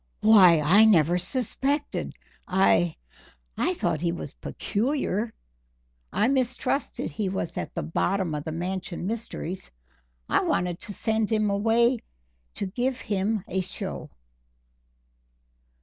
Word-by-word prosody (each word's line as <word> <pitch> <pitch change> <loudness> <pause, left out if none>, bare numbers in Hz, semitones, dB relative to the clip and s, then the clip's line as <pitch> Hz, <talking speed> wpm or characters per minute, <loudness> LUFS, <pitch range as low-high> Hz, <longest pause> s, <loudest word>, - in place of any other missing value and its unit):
"Why, 190 -7 +7
I 185 +9 +6
never 175 -4 +4
suspected 270 - -1 0.3
I 180 -3 +3 0.6
I - - 0
thought 155 - -1
he 170 -1 +1
was 165 -4 -6
peculiar 230 -2 -2 0.8
I 215 - +2
mistrusted 260 - -1
he 195 +6 -2
was 185 -3 -3
at - - -5
the - - -2
bottom 180 +1 0
of 150 -1 -3
the 160 - -4
Mansion 180 +1 -4
mysteries 195 -4 -4 0.6
I - - +2
wanted 175 -1 0
to 205 - -5
send 220 0 0
him 215 -2 +2
away 230 +4 +3 0.6
to - - -2
give 250 +6 -2
him 205 0 -1
a 190 -1 -1
show." 185 - -5
200 Hz, 120 wpm, -26 LUFS, 175-225 Hz, 0.8 s, Why